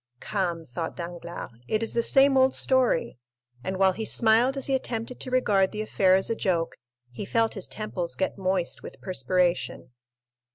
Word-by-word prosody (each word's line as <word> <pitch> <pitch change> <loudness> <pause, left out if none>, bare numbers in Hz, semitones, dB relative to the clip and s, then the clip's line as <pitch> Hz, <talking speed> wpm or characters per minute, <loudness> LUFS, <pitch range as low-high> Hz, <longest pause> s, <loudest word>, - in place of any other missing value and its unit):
"Come," 175 -5 -2
thought 165 +3 -4
Danglars, 175 -2 -7 0.2
"it 215 +1 0
is 225 - -2
the 235 - +2
same 270 +3 +5
old 260 0 +4
story." 255 - +1 0.4
And 190 +1 -3
while 190 0 +4
he 220 +4 -5
smiled 230 +5 +3
as 270 - -3
he 275 - 0
attempted 245 -2 -2
to 255 - -4
regard 205 -7 +2
the 215 0 -3
affair 190 -3 +3
as 190 - +1
a - - +1
joke, 170 -6 -1 0.3
he 125 - -6
felt 225 +2 +1
his 195 - -4
temples 185 -5 -4
get 190 - -1
moist 185 -2 -1
with - - -10
perspiration. 170 -6 0
195 Hz, 175 wpm, -26 LUFS, 175-230 Hz, 0.4 s, same